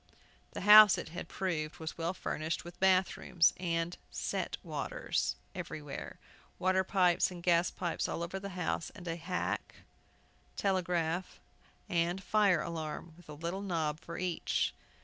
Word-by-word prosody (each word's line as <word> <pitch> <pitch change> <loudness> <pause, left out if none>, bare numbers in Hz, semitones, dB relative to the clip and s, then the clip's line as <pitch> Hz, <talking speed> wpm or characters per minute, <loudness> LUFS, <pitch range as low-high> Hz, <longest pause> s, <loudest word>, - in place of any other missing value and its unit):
The - - -5
house, 210 0 +10
it - - -5
had 175 +2 -6
proved, 165 -5 -2
was 160 -1 -5
well 170 +2 -2
furnished 160 0 -3
with 175 0 -10
bath 190 -1 +3
rooms, 170 -1 +3
and 170 -1 -1
"set - - -3
waters" - - -2 0.2
everywhere. 145 -2 -6 0.4
Water 185 +1 +2
pipes 180 -2 +3
and 175 -2 -9
gas 170 0 +4
pipes 175 -2 -2
all 170 - -2
over 185 +3 -4
the 195 -1 -7
house; 180 -1 -1
and 180 -3 -10
a 165 - -1
hack, 180 +2 -3 0.8
telegraph, 180 -2 0 0.5
and 175 +2 0
fire 195 -4 +3
alarm, 160 0 -5
with 175 -2 -18
a - - -6
little 170 +5 -4
knob 160 -6 -1
for 170 +1 -8
each. 180 -2 0
175 Hz, 150 wpm, -32 LUFS, 165-185 Hz, 0.8 s, house